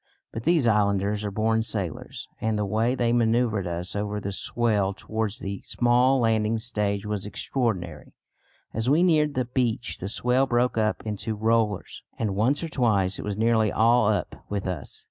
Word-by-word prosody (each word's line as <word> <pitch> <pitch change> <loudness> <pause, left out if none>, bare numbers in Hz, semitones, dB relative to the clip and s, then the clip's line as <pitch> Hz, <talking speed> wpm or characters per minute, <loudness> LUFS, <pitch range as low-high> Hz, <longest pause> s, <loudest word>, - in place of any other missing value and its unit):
But 115 - -6
these 165 -5 +3
islanders 105 -1 +1
are 105 - -2
born 110 +2 +1
sailors, 100 -8 -4
and 110 -1 0
the 105 - 0
way 110 +5 +1
they 120 -2 +1
manœuvred 115 -4 +1
us 85 +2 -4
over 105 0 -2
the 100 0 -4
swell 100 -2 0
towards 110 0 -3
the 100 0 -5
small 125 +2 +2
landing 110 -1 +2
stage 105 -3 -2
was 105 -1 -3
extraordinary. 95 - -3 0.6
As 115 +3 0
we 155 +5 +4
neared 155 -4 +3
the 130 -1 0
beach 120 -2 -1
the 95 - -4
swell 125 +4 +1
broke 125 0 +1
up 110 -1 0
into 110 +1 -3
rollers, 110 -2 0 0.2
and 105 -4 -1
once 125 +10 +1
or 165 - -3
twice 100 -9 +1
it - - -5
was 105 -1 -3
nearly 110 -2 +2
all 115 0 +4
up 105 -5 -1
with 100 -2 -3
us. 90 -7 -5
110 Hz, 175 wpm, -25 LUFS, 100-120 Hz, 0.6 s, we